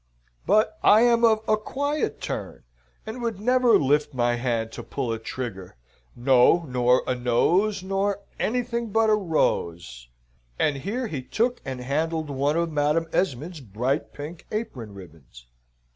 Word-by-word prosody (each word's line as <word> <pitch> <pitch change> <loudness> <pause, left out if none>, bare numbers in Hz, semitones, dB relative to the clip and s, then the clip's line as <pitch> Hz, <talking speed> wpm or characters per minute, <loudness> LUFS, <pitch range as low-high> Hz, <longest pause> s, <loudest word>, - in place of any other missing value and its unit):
But 215 +2 +2
I 215 +2 +6
am 235 -1 +4
of 220 -2 +5
a 215 - +4
quiet 285 +7 -2
turn, - - -5 0.4
and 220 +3 -6
would 230 -4 -3
never 250 +1 +4
lift 145 +1 +1
my 120 -1 +2
hand 120 -2 -1
to - - -7
pull 125 -5 -3
a 110 - -4
trigger, 110 - -6 0.4
no, 130 +7 +4
nor 125 0 +2
a 130 - 0
nose, 175 - +1
nor 195 +1 -1 0.2
anything 235 0 -1
but 220 +1 +3
a - - +6
rose," 85 - -1 0.5
and 145 -2 +1
here 220 - -3
he 155 - -4
took 240 - -1
and 130 -2 -5
handled 155 +3 -2
one 140 +3 0
of 170 -1 0
Madam 150 +2 +1
Esmond's 165 0 -1
bright 125 +5 -2
pink 155 +3 -9
apron 125 - -5
ribbons. 75 -10 -14
150 Hz, 150 wpm, -25 LUFS, -, 0.5 s, I